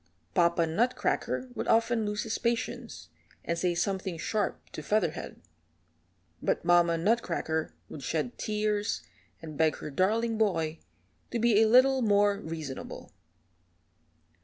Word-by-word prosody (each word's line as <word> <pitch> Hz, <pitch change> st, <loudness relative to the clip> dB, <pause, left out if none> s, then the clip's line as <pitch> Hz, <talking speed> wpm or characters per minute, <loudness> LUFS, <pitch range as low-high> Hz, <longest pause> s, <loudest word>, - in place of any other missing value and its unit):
Papa 170 Hz, -1 st, +3 dB
Nutcracker 240 Hz, +7 st, 0 dB
would -, -, -4 dB
often 230 Hz, -1 st, +2 dB
lose 210 Hz, 0 st, -2 dB
his 225 Hz, -1 st, -3 dB
patience, 235 Hz, +1 st, -3 dB, 0.4 s
and 170 Hz, -, 0 dB
say 175 Hz, 0 st, 0 dB
something 190 Hz, 0 st, -2 dB
sharp 210 Hz, +5 st, -1 dB
to -, -, -6 dB
Featherhead, 175 Hz, 0 st, -1 dB, 1.0 s
but -, -, -1 dB
Mamma 175 Hz, -1 st, +4 dB
Nutcracker 165 Hz, -5 st, 0 dB
would 150 Hz, -, -9 dB
shed 160 Hz, -, -2 dB
tears, 210 Hz, 0 st, -1 dB, 0.4 s
and 155 Hz, -2 st, -8 dB
beg 160 Hz, -1 st, +3 dB
her 150 Hz, -, -7 dB
darling 220 Hz, +8 st, +1 dB
boy 165 Hz, -7 st, 0 dB, 0.5 s
to 240 Hz, -, -2 dB
be 225 Hz, -2 st, +4 dB
a 220 Hz, -, +5 dB
little 260 Hz, +3 st, +5 dB
more 205 Hz, -2 st, +3 dB
reasonable. 160 Hz, -7 st, -7 dB
205 Hz, 125 wpm, -29 LUFS, 165-225 Hz, 1.0 s, a